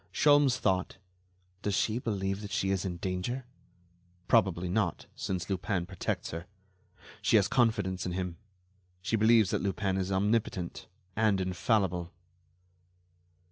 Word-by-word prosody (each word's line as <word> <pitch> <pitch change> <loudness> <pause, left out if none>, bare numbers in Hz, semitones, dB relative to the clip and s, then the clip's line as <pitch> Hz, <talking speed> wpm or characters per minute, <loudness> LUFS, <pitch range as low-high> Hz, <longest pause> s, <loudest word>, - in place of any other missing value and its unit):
Sholmes 145 -3 +4
thought: 95 -6 0 0.6
Does 100 -2 0
she 110 +3 +1
believe 100 -4 -2
that 105 - -6
she 95 0 0
is 95 -1 0
in 90 -2 -3
danger? 95 +9 -3 0.8
Probably 90 -1 +3
not—since 90 0 -2
Lupin 95 -1 -1
protects 95 -1 -3
her. 85 +2 -6 0.7
She - - +3
has 105 -2 +5
confidence 105 -6 +1
in 90 - -3
him. 90 -2 -3 0.7
She 115 - +1
believes 110 -2 +5
that - - 0
Lupin 95 -1 -1
is 95 0 -1
omnipotent, 100 -2 0 0.3
and 110 -3 +3
infallible. 90 -1 0
95 Hz, 125 wpm, -30 LUFS, 90-110 Hz, 0.8 s, has